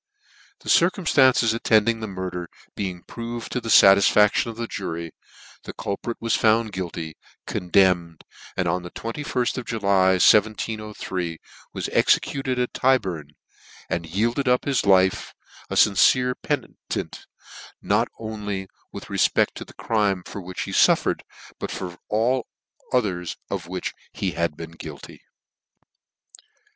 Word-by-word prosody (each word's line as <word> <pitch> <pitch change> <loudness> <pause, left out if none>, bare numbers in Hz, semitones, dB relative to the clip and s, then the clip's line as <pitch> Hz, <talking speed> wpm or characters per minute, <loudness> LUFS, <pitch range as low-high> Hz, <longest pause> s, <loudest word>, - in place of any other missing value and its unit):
The - - -8
circumftances 140 - +4
attending 115 0 +2
the 110 - -4
murder 90 -3 -5 0.3
being 90 -3 -4
proved 115 0 -7
to 125 - -2
the 115 - -6
fatisfaction 100 +3 +6
of 115 - -8
the 115 - -3
jury, 85 -6 -5 0.5
the - - -8
culprit 105 +4 -4
was 115 0 -1
found 110 0 +3
guilty, 85 -4 -5 0.3
condemned, 90 -2 +1 0.3
and 90 - 0
on 90 +2 0
the 90 - -8
aift 125 +4 -3
of 125 - -7
July, 100 -4 +2
1703, 105 -3 +1 0.4
was - - -3
executed 135 -2 +1
at 125 0 -1
Tyburn, 95 - 0 0.6
and 85 -1 -2
yielded 115 - 0
up 125 0 +2
his 135 -7 0
life 95 -1 +3 0.3
a - - -3
fincere 125 +5 +4
penitent, - - -5 0.5
not - - +1
only 105 -3 -5 0.2
with - - -9
re - - -4
fpec~t - - +3
to - - -7
the - - -16
crime 100 -5 0
for 100 - -7
which 90 0 -6
he - - -6
fuffered, - - +3 0.4
but - - -4
for 90 -2 -6
all 120 +4 +1 0.4
others 95 -9 -1
of 90 -4 -3
which 90 0 -4 0.2
he - - -2
had 85 -3 -2
been 80 -1 -8
guilty. 80 -3 -10
100 Hz, 135 wpm, -23 LUFS, 90-115 Hz, 0.6 s, fatisfaction